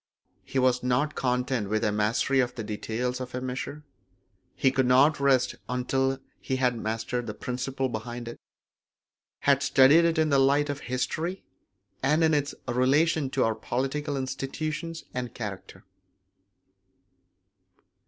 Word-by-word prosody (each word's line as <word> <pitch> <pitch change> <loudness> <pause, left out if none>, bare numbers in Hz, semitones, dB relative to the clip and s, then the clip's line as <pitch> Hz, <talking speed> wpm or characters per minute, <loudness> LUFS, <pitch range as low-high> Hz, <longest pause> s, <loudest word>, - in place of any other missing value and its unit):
He - - -5
was 125 -1 +3
not 125 +4 +1
content 125 -4 -1
with 110 +1 0
a 105 - +2
mastery 105 +6 +1
of 125 -1 0
the 115 - -4
details 115 +4 -3
of 125 0 -6
a - - -1
measure; 130 +4 -5 0.7
he 135 - +3
could 130 -1 +1
not 135 +5 +5
rest 135 -2 +3 0.2
until 135 +2 0 0.2
he 130 - -2
had 125 -2 +1
mastered 115 +2 -3
the 105 - -5
principle 130 +1 -3
behind 120 +1 -6
it, 115 - -8 1.0
had - - +3
studied 140 +6 +6
it 165 -1 +1
in 160 -1 +3
the 140 -2 +4
light 145 +2 +3
of 145 - -6
history, 160 +9 -3 0.6
and 150 +5 +2
in 160 -1 +4
its 145 -1 0
relation 135 +4 +2
to 135 -1 +1
our 115 - +2
political 135 +6 -2
institutions 155 +5 -4
and 125 -1 -4
character. 95 -5 -7
130 Hz, 145 wpm, -27 LUFS, 125-140 Hz, 1.0 s, studied